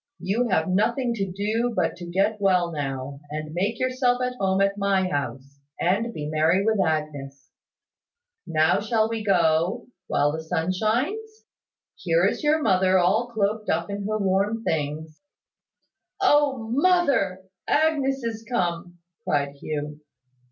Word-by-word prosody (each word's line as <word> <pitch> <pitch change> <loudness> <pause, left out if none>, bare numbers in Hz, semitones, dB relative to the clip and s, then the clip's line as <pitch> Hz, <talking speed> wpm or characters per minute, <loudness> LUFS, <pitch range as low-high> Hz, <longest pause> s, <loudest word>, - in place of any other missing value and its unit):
You 225 +7 -1
have 160 -5 +1
nothing 235 +6 +1
to 195 -4 -3
do 220 +5 -1
but 180 -3 0
to 175 0 -8
get 200 +4 0
well 180 -3 +2
now, 140 -2 -4
and 155 +1 -5
make 195 +6 -1
yourself 255 -1 +1
at 250 0 -1
home 190 0 +1
at 195 0 +2
my 195 -2 +1
house, 140 -2 -4 0.2
and 205 +7 +1
be 150 -9 -6
merry 160 +6 +2
with 220 -2 +2
Agnes. 145 -3 -4 1.0
Now 160 +2 +3
shall 220 +1 +1
we 225 -1 -4
go, 175 +2 +2 0.2
while 145 0 +2
the 160 +1 -4
sun 160 +2 -1
shines? 340 - -2 0.5
Here 170 0 +1
is 200 - -1
your 300 +1 +2
mother 190 -3 +3
all 195 +7 +2
cloaked 215 -2 -1
up 170 +4 0
in 200 0 -4
her 215 0 0
warm 200 +3 0
things." 155 -1 -3 1.0
"O, 290 -7 +3
mother! 275 - +2 0.2
Agnes 280 -4 +1
is 225 -1 -4
come," 175 -4 -2 0.3
cried 140 -1 0
Hugh. 150 0 -5
195 Hz, 145 wpm, -24 LUFS, 160-230 Hz, 1.0 s, Now